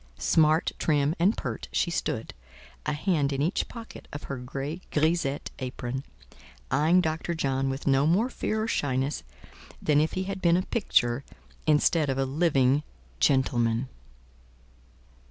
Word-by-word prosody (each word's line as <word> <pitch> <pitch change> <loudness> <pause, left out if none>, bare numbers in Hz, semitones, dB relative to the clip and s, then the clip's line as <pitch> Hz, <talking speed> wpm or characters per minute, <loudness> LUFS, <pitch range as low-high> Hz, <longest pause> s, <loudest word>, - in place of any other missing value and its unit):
Smart, 155 0 +3
trim 145 -1 +2
and 190 +6 +3
pert, - - -4
she - - +1
stood, - - -2 0.5
a 150 - +1
hand 150 -2 +1
in 135 - -2
each 160 +7 0
pocket 230 -1 -10
of 145 - -7
her 140 - -5
gay 140 +6 -5
grisette 155 -2 0
apron, 130 0 -4 0.7
eyeing 160 +6 +4
Dr. 160 +1 -2
John 135 -3 0
with 135 +1 -4
no 140 +1 +3
more 195 +9 +3
fear 215 0 -1
or - - -2
shyness 135 - 0 0.6
than 150 -1 +3
if 155 - 0
he 185 - -1
had 190 0 -5
been 170 0 +4
a 185 - 0
picture 130 - +1 0.4
instead 155 0 +3
of 135 - 0
a 135 - +1
living 140 -2 +2 0.4
gentleman. 120 - +2
145 Hz, 145 wpm, -27 LUFS, 135-170 Hz, 0.7 s, eyeing